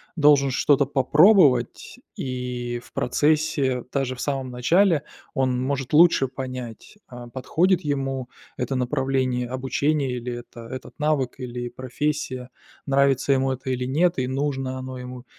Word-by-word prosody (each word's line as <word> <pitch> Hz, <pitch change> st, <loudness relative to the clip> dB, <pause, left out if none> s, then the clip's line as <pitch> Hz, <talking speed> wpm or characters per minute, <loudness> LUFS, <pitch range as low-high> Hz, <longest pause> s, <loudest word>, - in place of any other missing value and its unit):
должен 145 Hz, -3 st, +4 dB
что-то 140 Hz, +2 st, +3 dB
попробовать, 145 Hz, -, +4 dB, 0.2 s
и 125 Hz, -2 st, -4 dB
в -, -, -19 dB
процессе, 140 Hz, -2 st, +1 dB
даже 135 Hz, -2 st, -1 dB
в 125 Hz, -, -8 dB
самом 135 Hz, -3 st, -2 dB
начале, 160 Hz, +6 st, +3 dB, 0.3 s
он 130 Hz, -2 st, 0 dB
может 135 Hz, -1 st, -2 dB
лучше 160 Hz, -3 st, +5 dB
понять, 130 Hz, -, -7 dB
а, 120 Hz, -1 st, -10 dB
подходит 160 Hz, +9 st, +1 dB
ему 135 Hz, -3 st, -2 dB, 0.3 s
это 125 Hz, +2 st, -2 dB
направление 130 Hz, -1 st, 0 dB
обучения, 135 Hz, +1 st, -1 dB
или 125 Hz, 0 st, -5 dB
это 120 Hz, -1 st, -9 dB
этот 130 Hz, +1 st, -8 dB
навык, 150 Hz, -4 st, 0 dB
или 120 Hz, -1 st, -5 dB
профессия, 130 Hz, +1 st, -3 dB, 0.4 s
нравится 140 Hz, 0 st, +3 dB
ему 135 Hz, 0 st, +1 dB
это 130 Hz, +1 st, -5 dB
или 125 Hz, 0 st, -2 dB
нет, 165 Hz, +7 st, +2 dB
и 130 Hz, -1 st, 0 dB
нужно 135 Hz, -1 st, -2 dB
оно 130 Hz, 0 st, -6 dB
ему, 125 Hz, 0 st, -9 dB
130 Hz, 135 wpm, -24 LUFS, 125-145 Hz, 0.4 s, лучше